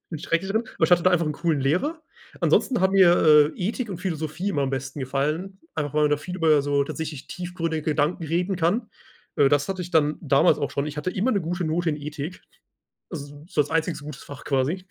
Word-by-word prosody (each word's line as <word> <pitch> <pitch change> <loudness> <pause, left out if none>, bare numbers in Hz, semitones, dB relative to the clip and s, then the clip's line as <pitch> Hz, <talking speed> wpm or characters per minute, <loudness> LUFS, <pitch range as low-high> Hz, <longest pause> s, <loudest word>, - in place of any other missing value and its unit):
Bin 160 - -5
schrecklich 170 +6 -1
drin. 220 +3 0
Aber - - +3
ich - - 0
hatte 175 -1 +5
da 185 - +4
einfach 170 -2 +2
'n 150 - 0
coolen 165 -2 0
Lehrer. 185 - 0 0.4
Ansonsten 245 -6 +2
hat 190 0 +3
mir, 160 -5 +6
äh, - - -17
Ethik 215 +4 -2
und 180 - -5
Philosophie 170 0 -3
immer 145 -8 0
am 135 - -1
besten 135 +2 -4
gefallen, 150 +9 -2 0.2
einfach 145 -2 -2
weil 150 0 +2
man 150 - +2
da - - +3
viel 180 +5 -7
über 155 -5 +4
so 145 0 +1
tatsächlich 150 -1 -5
tiefgründige 165 -3 -4
Gedanken 155 +3 0
reden 175 +4 -1
kann. 190 +7 0 0.5
Äh, 140 -2 +4
das 145 0 +2
hatte 190 -1 -3
ich 175 - -8
dann 155 -2 +2
damals 155 +2 +4
auch 140 - -2
schon. 140 +1 -2
Ich 150 0 -6
hatte 150 +5 -2
immer 205 +8 0
'ne 200 -7 0
gute 175 +2 -2
Note 165 +2 0
in 150 - -2
Ethik, 150 +4 -6 0.7
also, 145 -3 -8
so 150 - 0
als 145 - -10
einziges 160 -1 -1
gutes 150 -2 -8
Fach 140 -2 -10
quasi. 145 +7 0
160 Hz, 230 wpm, -24 LUFS, 145-180 Hz, 0.7 s, mir